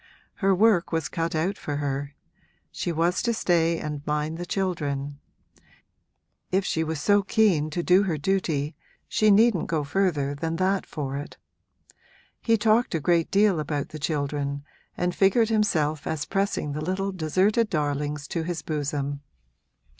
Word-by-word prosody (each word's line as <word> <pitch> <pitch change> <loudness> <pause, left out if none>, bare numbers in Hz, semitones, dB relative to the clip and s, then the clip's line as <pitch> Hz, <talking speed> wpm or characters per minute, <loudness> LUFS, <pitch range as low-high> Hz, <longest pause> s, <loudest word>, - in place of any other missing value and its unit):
Her 195 -2 +3
work 205 -3 +3
was 165 -2 -1
cut 165 -1 -2
out 180 +6 -1
for 145 - -4
her 140 0 -3 0.6
she 175 - -3
was 170 +3 +1
to 235 -1 0
stay 170 -4 +2
and 150 -2 -5
mind 150 +2 -1
the 175 - -5
children: 145 -7 -2 1.3
if 190 +1 +1
she 160 - 0
was 160 -1 -3
so 205 +5 +4
keen 195 -6 +2
to 170 +3 -3
do 180 +3 +5
her 180 -6 -1
duty 155 -3 -1 0.3
she 215 - +2
needn't 210 -3 +4
go 160 -3 0
further 145 -3 0
than 160 +3 -3
that 190 +2 0
for 140 -3 -4
it. 145 +2 -8 1.0
He 225 -1 +3
talked 220 0 +2
a - - +1
great 165 +1 +2
deal 200 -4 +3
about 145 -1 -3
the 155 - -8
children 140 -1 -2 0.3
and 180 0 0
figured 210 +4 +3
himself 160 -9 +1
as 155 -2 -2
pressing 195 -6 -1
the 150 +2 -4
little 190 +4 -1
deserted 190 +6 +1
darlings 145 -2 -2
to 170 - -2
his 165 -2 -4
bosom. 145 -2 -3
165 Hz, 155 wpm, -25 LUFS, 150-195 Hz, 1.3 s, do